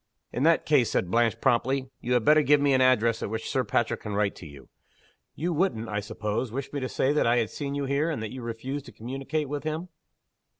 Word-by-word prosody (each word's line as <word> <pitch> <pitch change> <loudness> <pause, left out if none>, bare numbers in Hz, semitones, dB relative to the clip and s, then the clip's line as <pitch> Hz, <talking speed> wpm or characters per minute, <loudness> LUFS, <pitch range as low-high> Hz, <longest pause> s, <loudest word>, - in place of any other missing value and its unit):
"In 125 - -2
that 165 +3 +4
case," 140 -7 +3
said 90 - -1
Blanche, 115 0 +2
promptly, 130 +1 +1
"you 125 - -1
had 125 -3 +2
better 155 +1 +6
give 145 0 +4
me 140 -1 +3
an 130 - +3
address 115 -3 +3
at - - -3
which 110 +1 -4
Sir 130 - 0
Patrick 115 +1 0
can 105 -2 -5
write 100 -1 +1
to 85 - -10
you. 70 -4 -13 0.7
You 170 +3 -1
wouldn't, 135 - 0
I 105 -1 -1
suppose, 105 +2 -3
wish 135 +4 -5
me 145 - -1
to 130 -1 -3
say 135 +2 +1
that 150 - +2
I 120 +1 +3
had 115 -3 0
seen 140 -1 -4
you 140 -1 -1
here, 140 +4 0
and 155 - -2
that 110 - -5
you 130 - -7
refused 125 +5 -5
to - - -10
communicate 135 +5 -4
with 145 0 -4
him?" 155 +3 -3
130 Hz, 245 wpm, -27 LUFS, 115-145 Hz, 0.7 s, better